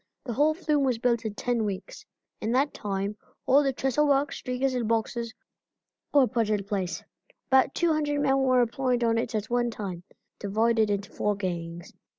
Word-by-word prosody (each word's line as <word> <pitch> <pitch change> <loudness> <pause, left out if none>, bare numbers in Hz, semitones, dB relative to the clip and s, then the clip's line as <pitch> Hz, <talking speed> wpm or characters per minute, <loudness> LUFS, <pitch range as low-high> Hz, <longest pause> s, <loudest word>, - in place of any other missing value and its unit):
The 240 - -3
whole 300 +5 +3
flume 300 -4 +1
was 255 -3 +1
built 235 -1 +1
in 210 -2 -3
ten 240 -1 0
weeks. 200 -3 -5 0.4
In 220 - -1
that 275 +3 +2
time 200 0 -3 0.3
all 275 +2 +5
the 275 -2 +1
trestle 270 +3 +1
work, 280 0 +2
stringers 255 +1 -2
and 245 -3 -1
boxes 230 +1 -1 0.8
were 285 -3 +6
put 230 -4 0
in 210 -2 +1
place. 195 -3 -3 0.5
About 265 0 +4
200 305 -4 +1
men 270 -1 +3
were 255 -2 +4
employed 245 +1 0
on 230 -1 +2
it 230 -1 -3
at 215 +2 -3
one 240 0 +2
time, 200 -5 -5
being - - -26 0.4
divided 225 0 +3
into 200 -1 -2
four 210 0 0
gangs. 175 -3 -5
235 Hz, 180 wpm, -27 LUFS, 210-270 Hz, 0.8 s, were